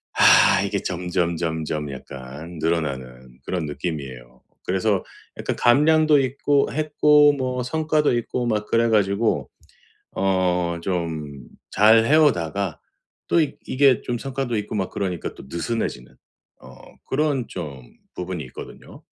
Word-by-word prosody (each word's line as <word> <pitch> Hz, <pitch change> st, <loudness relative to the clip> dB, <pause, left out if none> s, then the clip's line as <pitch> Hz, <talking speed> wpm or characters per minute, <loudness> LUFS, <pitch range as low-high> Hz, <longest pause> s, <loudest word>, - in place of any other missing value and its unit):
아 -, -, +6 dB
이게 -, -, -2 dB
점점점점 85 Hz, -4 st, -2 dB
약간 70 Hz, +5 st, -9 dB
늘어나는 65 Hz, -6 st, -3 dB
그런 90 Hz, -4 st, -3 dB
느낌이에요. 70 Hz, -6 st, -6 dB, 0.2 s
그래서 95 Hz, +1 st, 0 dB, 0.3 s
약간 -, -, -2 dB
감량도 150 Hz, +3 st, +4 dB
있고 140 Hz, +2 st, +1 dB
했고 150 Hz, -1 st, +4 dB
뭐 130 Hz, -2 st, -2 dB
성과도 155 Hz, -1 st, +1 dB
있고 120 Hz, +1 st, -2 dB
막 105 Hz, -2 st, -1 dB
그래 115 Hz, 0 st, +2 dB
가지고 105 Hz, +1 st, +1 dB, 0.7 s
어 90 Hz, -3 st, +1 dB
좀 80 Hz, -7 st, -4 dB, 0.2 s
잘 110 Hz, +2 st, +5 dB
해오다가 100 Hz, -, +2 dB, 0.5 s
또 170 Hz, -, +3 dB
익 150 Hz, -, -1 dB
이게 135 Hz, -2 st, +4 dB
좀 120 Hz, -1 st, -3 dB
성과도 135 Hz, -3 st, -3 dB
있고 105 Hz, +1 st, -5 dB
막 95 Hz, -3 st, -2 dB
그러니까 90 Hz, -4 st, -3 dB
또 -, -, -12 dB
느슨해지는 85 Hz, -, -4 dB, 0.5 s
어 -, -, -13 dB, 0.3 s
그런 140 Hz, -3 st, 0 dB
좀 75 Hz, -8 st, -7 dB, 0.3 s
부분이 90 Hz, -3 st, -4 dB
있거든요. -, -, -12 dB
95 Hz, 260 characters per minute, -22 LUFS, 80-130 Hz, 0.7 s, 아